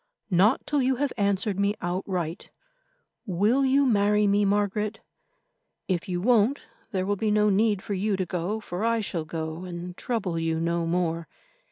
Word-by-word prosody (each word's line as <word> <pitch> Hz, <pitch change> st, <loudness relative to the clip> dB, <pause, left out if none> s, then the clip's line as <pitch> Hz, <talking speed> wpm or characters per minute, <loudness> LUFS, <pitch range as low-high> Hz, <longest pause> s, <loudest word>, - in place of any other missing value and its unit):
"Not 195 Hz, +8 st, +3 dB
till 290 Hz, -2 st, +1 dB
you 260 Hz, +1 st, +2 dB
have 280 Hz, +1 st, -1 dB
answered 200 Hz, -1 st, 0 dB
me 200 Hz, +1 st, +2 dB
outright. 175 Hz, -2 st, -3 dB, 0.8 s
Will 210 Hz, +9 st, +2 dB
you 275 Hz, +1 st, +4 dB
marry 210 Hz, -3 st, +3 dB
me, 205 Hz, +1 st, +3 dB
Margaret? 205 Hz, +2 st, 0 dB, 0.9 s
If 185 Hz, 0 st, -2 dB
you 175 Hz, -1 st, -1 dB
won't, 235 Hz, +5 st, +3 dB, 0.3 s
there 185 Hz, -4 st, -1 dB
will 205 Hz, +1 st, 0 dB
be 215 Hz, +2 st, -1 dB
no 210 Hz, 0 st, +3 dB
need 205 Hz, -1 st, +2 dB
for 205 Hz, -, -3 dB
you 200 Hz, +1 st, 0 dB
to 190 Hz, -, -1 dB
go, 180 Hz, +5 st, -2 dB
for 185 Hz, -2 st, -5 dB
I 230 Hz, 0 st, +2 dB
shall 170 Hz, -6 st, -3 dB
go 160 Hz, +1 st, -5 dB
and 180 Hz, 0 st, -7 dB
trouble 190 Hz, -9 st, -2 dB
you 165 Hz, 0 st, -1 dB
no 170 Hz, 0 st, 0 dB
more. 165 Hz, -1 st, -1 dB
200 Hz, 170 wpm, -26 LUFS, 175-215 Hz, 0.9 s, you